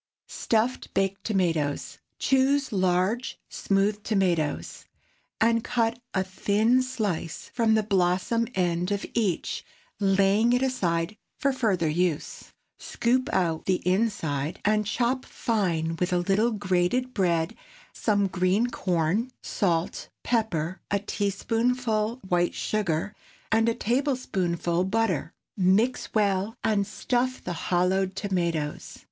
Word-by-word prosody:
STUFFED 230 +3 0
BAKED 195 0 0
TOMATOES. 165 -8 0
✠ - - -10 0.2
Choose 270 0 +2
large, 190 +5 +1
smooth 200 +1 0
tomatoes, 180 -8 -1 0.5
and 230 0 +3
cut 235 -1 0 0.2
a 190 - +2
thin 210 +6 +2
slice 210 -10 -3
from 225 -2 +3
the 220 - +2
blossom 195 +3 +1
end 175 -1 0
of 200 0 -1
each, 205 -8 -1 0.4
laying 200 +3 +3
it 250 +1 +2
aside 180 -7 0 0.2
for 275 0 +1
further 210 -10 +1
use. 165 0 -1 0.3
Scoop 255 +4 0
out 165 - 0
the 185 -2 0
inside, 180 -8 0
and 210 0 +2
chop 250 +4 0
fine 170 -8 -1
with 180 0 0
a 180 - +2
little 195 +6 +2
grated 205 +4 0
bread, 170 -4 +1 0.4
some 205 -2 +1
green 190 +5 +1
corn, 180 +6 0
salt, 170 -5 -1
pepper, 190 -7 -1
a 200 - +2
teaspoonful 225 +3 -1
white 175 -1 +1
sugar, 200 -3 -1 0.4
and 225 +1 +4
a 230 - 0
tablespoonful 190 - 0
butter. 190 -6 0 0.2
Mix 205 +6 +2
well, 205 0 +1
and 205 -2 +1
stuff 250 +4 -1
the - - -3 0.2
hollowed 185 +1 +1
tomatoes. 170 -7 -2
200 Hz, 115 wpm, -26 LUFS, 180-230 Hz, 0.5 s, and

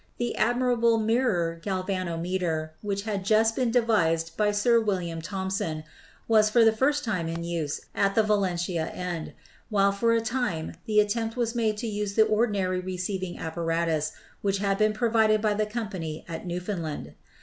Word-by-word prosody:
The 240 -1 -2
admirable 240 -1 +2
mirror 215 -8 +1
galvanometer, 180 -4 -2
which 200 -1 -2
had 205 -3 -2
just 220 +2 +3
been 255 -3 +1
devised 165 -9 +2
by 210 -1 +2
Sir 220 +3 +3
William 180 -6 -2
Thomson, 190 -3 -3 0.4
was 215 -2 +5
for 230 +1 +5
the 225 - +6
first 285 +6 +1
time 185 -8 -1
in 165 +1 -4
use 165 -4 -3
at 200 -1 +1
the 220 - +5
Valentia 180 -5 0
end, 175 -3 -5 0.4
while 200 -2 +3
for 230 +4 +1
a 230 - +3
time 225 -9 -2
the 210 -1 +4
attempt 225 +2 0
was 235 -1 0
made 220 -3 0
to 230 - -3
use 205 -2 -3
the 220 - +6
ordinary 205 -4 +1
receiving 185 0 -4
apparatus 165 -1 -1 0.3
which 200 -1 +1
had 195 0 0
been 215 0 +3
pro 230 +1 0
vided 220 -1 +4
by 210 0 +1
the 210 0 0
company 195 -9 -5
at 165 +1 -6
Newfoundland. 170 - -4
200 Hz, 165 wpm, -27 LUFS, 170-220 Hz, 0.4 s, the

